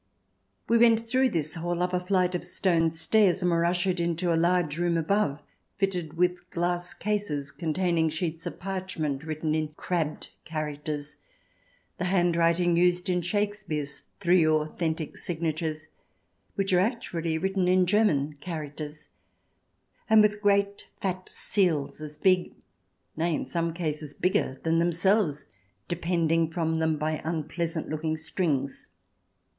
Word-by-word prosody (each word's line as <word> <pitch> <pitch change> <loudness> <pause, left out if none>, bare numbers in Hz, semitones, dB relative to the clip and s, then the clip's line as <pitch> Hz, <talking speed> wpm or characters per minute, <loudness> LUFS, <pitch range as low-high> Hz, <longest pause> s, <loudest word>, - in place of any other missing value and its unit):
We 230 0 +4
went 230 -1 +6
through 260 +2 +3
this 155 -7 -2
hall 175 +1 -2
up 180 0 -1
a 180 - +2
flight 180 0 +1
of 180 - -2
stone 165 -4 +1
stairs, 185 +3 +2
and 180 - +3
were 170 0 +2
ushered 175 +1 +1
into 170 0 0
a - - +2
large 170 -2 +1
room 175 -1 +1
above 165 -3 0 0.3
fitted 180 -5 -1
with 175 +1 0
glass 175 +1 -1
cases 200 -10 -2
containing 165 -1 0
sheets 160 +1 -3
of - - -6
parchment 185 -7 -3
written 155 0 -2
in 155 -1 -2
crabbed 165 -4 -2
characters 150 -1 -3 0.4
— - - -38
the 180 - -1
hand 175 -2 +2
writing 170 +1 +3
used 180 +1 +2
in 180 -1 +1
Shakespeare's 175 -7 -2
three 180 -2 +4
authentic 155 0 -1
signatures, 160 -2 -3 0.7
which 195 -1 0
are 180 - +5
actually 175 -7 -1
written 190 +1 0
in 185 0 +4
German 175 -8 +2
characters 150 -1 -6 0.5
— - - -41
and 220 -1 +7
with 210 0 +1
great 200 0 +1
fat 185 -1 -3
seals 165 -8 +1
as 150 -1 -7
big, 185 -2 +2 0.6
nay, 165 0 0
in - - -3
some 170 -1 -1
cases 155 -3 -3
bigger, 180 -7 +1
than 165 0 +2
themselves, 175 -1 +2 0.4
depending 165 -2 +1
from 160 -1 -1
them 160 -1 +1
by 155 +1 -2
unpleasant 165 +1 -2
looking 155 +1 -2
strings. 150 -4 -1
170 Hz, 140 wpm, -27 LUFS, 155-185 Hz, 0.7 s, and